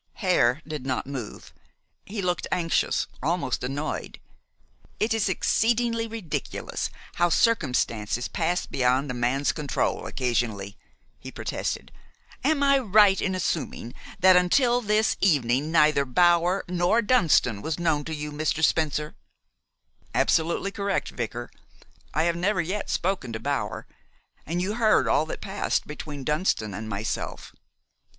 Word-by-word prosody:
Hare 155 Hz, -, +2 dB
did 150 Hz, -4 st, -5 dB
not 130 Hz, -1 st, -2 dB
move. 130 Hz, -5 st, -7 dB, 0.5 s
He 205 Hz, -1 st, -4 dB
looked 180 Hz, -1 st, -1 dB
anxious, 170 Hz, -2 st, +1 dB, 0.2 s
almost 160 Hz, -3 st, -1 dB
annoyed. 140 Hz, +4 st, -4 dB, 0.8 s
"It 220 Hz, +2 st, +1 dB
is 220 Hz, -3 st, +1 dB
exceedingly 230 Hz, +3 st, +1 dB
ridiculous 220 Hz, -8 st, -4 dB, 0.3 s
how 175 Hz, 0 st, +3 dB
circumstances 125 Hz, -, +1 dB
pass 175 Hz, +1 st, -1 dB
beyond 130 Hz, +2 st, +1 dB
a -, -, -3 dB
man's 125 Hz, +4 st, +1 dB
control 150 Hz, -3 st, -2 dB
occasionally," 115 Hz, -6 st, -2 dB, 0.4 s
he -, -, -9 dB
protested. -, -, -4 dB, 0.5 s
"Am 285 Hz, +1 st, +2 dB
I 275 Hz, -1 st, +5 dB
right 205 Hz, -4 st, +5 dB
in 190 Hz, -1 st, 0 dB
assuming 155 Hz, -9 st, -3 dB, 0.3 s
that 185 Hz, 0 st, +7 dB
until 240 Hz, +7 st, +3 dB
this 215 Hz, 0 st, +1 dB
evening 145 Hz, -4 st, +2 dB
neither 155 Hz, -3 st, +4 dB
Bower 175 Hz, +6 st, +3 dB
nor 180 Hz, +6 st, +2 dB
Dunston 165 Hz, -, +3 dB
was 160 Hz, +4 st, -3 dB
known 160 Hz, -4 st, +1 dB
to 160 Hz, -, -4 dB
you, 150 Hz, 0 st, -5 dB
Mr. 155 Hz, +1 st, -1 dB
Spencer?" 150 Hz, -1 st, +1 dB, 1.0 s
"Absolutely 170 Hz, +4 st, +1 dB
correct, 200 Hz, -1 st, -2 dB
vicar. 120 Hz, 0 st, -5 dB, 0.6 s
I 155 Hz, -, +1 dB
have 170 Hz, 0 st, +1 dB
never 190 Hz, +3 st, 0 dB
yet 185 Hz, +5 st, -2 dB
spoken 180 Hz, -10 st, -1 dB
to 110 Hz, -, -4 dB
Bower, 140 Hz, +2 st, -3 dB, 0.6 s
and 175 Hz, +3 st, -1 dB
you 200 Hz, +3 st, -1 dB
heard 220 Hz, -2 st, +3 dB
all 155 Hz, -, +2 dB
that -, -, -6 dB
passed 200 Hz, 0 st, -1 dB
between 150 Hz, -2 st, -7 dB
Dunston 150 Hz, -, 0 dB
and 110 Hz, +3 st, -6 dB
myself." 105 Hz, +1 st, -4 dB
165 Hz, 130 wpm, -26 LUFS, 135-195 Hz, 1.0 s, that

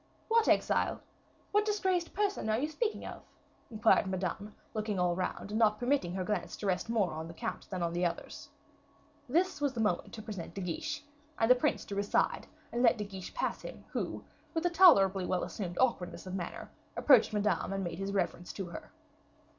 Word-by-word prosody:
"What 455 Hz, 0 st, +4 dB
exile? -, -, +2 dB, 0.5 s
what 415 Hz, +1 st, +4 dB
disgraced 380 Hz, -5 st, 0 dB
person 400 Hz, -, 0 dB
are 215 Hz, -, +3 dB
you 285 Hz, +5 st, 0 dB
speaking 425 Hz, +9 st, -2 dB
of?" -, -, -7 dB, 0.5 s
inquired 220 Hz, -3 st, +3 dB
Madame, 190 Hz, +2 st, -3 dB, 0.2 s
looking 215 Hz, -2 st, -2 dB
all 180 Hz, -1 st, +2 dB
round, 185 Hz, +2 st, -3 dB
and 215 Hz, -, 0 dB
not 215 Hz, -2 st, +4 dB
permitting 245 Hz, -8 st, 0 dB
her 190 Hz, -, -1 dB
glance 190 Hz, -1 st, -2 dB
to -, -, -6 dB
rest 190 Hz, +3 st, 0 dB
more 215 Hz, -6 st, +1 dB
on 160 Hz, +1 st, -5 dB
the 165 Hz, -, -10 dB
count -, -, -5 dB
than 185 Hz, -3 st, -2 dB
on 170 Hz, 0 st, -1 dB
the 175 Hz, +1 st, 0 dB
others. 170 Hz, -, -3 dB, 0.8 s
This 350 Hz, +3 st, +1 dB
was 285 Hz, -2 st, +1 dB
the 240 Hz, -, -5 dB
moment 210 Hz, -6 st, 0 dB
to 220 Hz, -, -7 dB
present 205 Hz, -6 st, -7 dB
De 195 Hz, -, -4 dB
Guiche, 300 Hz, -, -3 dB, 0.3 s
and 225 Hz, +2 st, +4 dB
the -, -, +12 dB
prince 250 Hz, -, 0 dB
drew 200 Hz, 0 st, -3 dB
aside 205 Hz, -, +1 dB, 0.2 s
and 240 Hz, -, -1 dB
let 235 Hz, -2 st, +5 dB
De 210 Hz, -, -2 dB
Guiche 190 Hz, -2 st, -8 dB
pass -, -, -1 dB
him, -, -, -9 dB
who, -, -, -3 dB, 0.3 s
with 325 Hz, +1 st, 0 dB
a 350 Hz, -, +3 dB
tolerably 200 Hz, -, +6 dB
well 185 Hz, -, 0 dB
assumed 180 Hz, -5 st, -5 dB
awkwardness 195 Hz, -10 st, 0 dB
of 185 Hz, -, -6 dB
manner, 190 Hz, -2 st, -5 dB, 0.3 s
approached 255 Hz, -7 st, +6 dB
Madame 210 Hz, -1 st, 0 dB
and 195 Hz, 0 st, -2 dB
made 170 Hz, 0 st, -4 dB
his 195 Hz, 0 st, -2 dB
reverence 175 Hz, -2 st, -1 dB
to 195 Hz, -, -4 dB
her. -, -, -9 dB
210 Hz, 200 wpm, -32 LUFS, 185-260 Hz, 0.8 s, the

